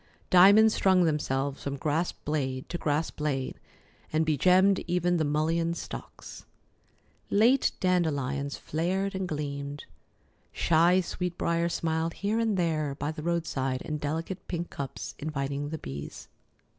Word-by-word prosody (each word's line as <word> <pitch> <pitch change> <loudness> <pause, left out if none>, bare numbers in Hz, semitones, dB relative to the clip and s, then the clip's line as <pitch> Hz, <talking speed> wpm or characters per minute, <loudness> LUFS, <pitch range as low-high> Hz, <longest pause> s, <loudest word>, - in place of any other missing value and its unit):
Diamonds 205 +4 +7
strung 185 -2 +4
themselves 140 -3 -1
from 140 0 -4
grass 155 +5 0
blade 135 -3 -3
to 175 - -4
grass 150 +1 0
blade, 140 -3 -3 0.5
and 155 +1 +2
begemmed 185 +6 +4
even 175 0 +1
the 160 - +1
mullein 165 +3 0
stalks. - - -8 0.9
Late 235 +6 +4
dandelions 145 -6 0
flared 190 +5 -1
and 190 -1 -2
gleamed, 145 -2 -4 0.7
shy 170 +3 +3
sweet 180 0 -4
brier 170 0 +1
smiled 165 0 -1
here 210 +3 -1
and 220 -3 +1
there 155 -5 0
by 145 +1 -3
the 155 - -7
roadside 150 -6 -1
in 150 -1 -4
delicate 165 +6 -4
pink 170 -1 -4
cups, 140 -2 -6
inviting 145 -1 -3
the 160 - -4
bees. 70 - -8
160 Hz, 130 wpm, -28 LUFS, 145-180 Hz, 0.9 s, Diamonds